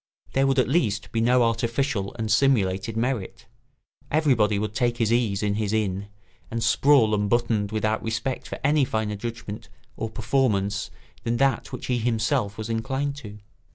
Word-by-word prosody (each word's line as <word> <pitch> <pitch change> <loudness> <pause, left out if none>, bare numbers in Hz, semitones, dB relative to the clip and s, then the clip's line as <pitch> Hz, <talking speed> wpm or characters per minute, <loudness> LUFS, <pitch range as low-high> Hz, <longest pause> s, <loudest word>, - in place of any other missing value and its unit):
There 135 0 +3
would 135 -1 +1
at 130 - +3
least 110 -9 0
be 115 - 0
no 125 +1 +4
artificial 115 -2 -1
and 110 -2 -2
simulated 110 -4 +2
merit; 115 -6 -2 0.6
everybody 125 -9 +3
would 105 +1 -2
take 120 +2 0
his 115 -1 +2
ease 110 -5 +1
in 105 -1 +1
his 105 0 -1
inn 100 -2 -1 0.4
and 115 0 -2
sprawl 135 -7 +4
unbuttoned 105 0 +1
without 110 0 0
respect 115 +4 -3
for - - -6
any 145 +1 +3
finer 110 -4 -1
judgment 115 -1 -6 0.3
or 115 - -4
performance 110 -4 0 0.3
than 115 +1 -1
that 135 -2 +1
which 125 - -6
he 125 -1 0
himself 110 -3 0
was 110 0 -4
inclined 135 +5 -2
to. 105 -7 -9
115 Hz, 160 wpm, -25 LUFS, 105-125 Hz, 0.6 s, no